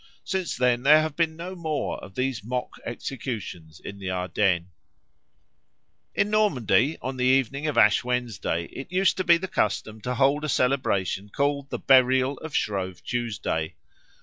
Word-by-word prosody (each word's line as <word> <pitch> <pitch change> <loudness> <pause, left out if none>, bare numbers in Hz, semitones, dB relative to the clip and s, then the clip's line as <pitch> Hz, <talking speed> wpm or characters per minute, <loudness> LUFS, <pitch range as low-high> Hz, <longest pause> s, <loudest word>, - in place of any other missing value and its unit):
Since 185 -6 -2
then 125 -1 +2
there 150 +4 +6
have 155 -2 -4
been 160 -1 0
no 175 +3 -6
more 160 -4 -3
of 95 - -11
these 130 -4 -2
mock 125 +3 -4
executions 110 - -6
in 100 0 -9
the 95 -1 -4
Ardennes. 90 -1 0 1.5
In 205 - +1
Normandy 145 - +2
on 130 0 -4
the 125 - 0
evening 135 +3 +2
of 150 - -2
Ash 105 +4 +5
Wednesday 120 -8 -2
it 135 - -8
used 185 +1 +3
to 185 - 0
be 170 -2 +6
the 190 +2 -5
custom 110 - -1
to 125 +3 -3
hold 140 +3 +2
a 155 - -2
celebration 105 -8 0
called 140 +3 -1
the - - -3
Burial 130 0 +4
of 160 -2 -7
Shrove 95 -3 -2
Tuesday. 110 -9 -2
130 Hz, 160 wpm, -25 LUFS, 105-150 Hz, 1.5 s, there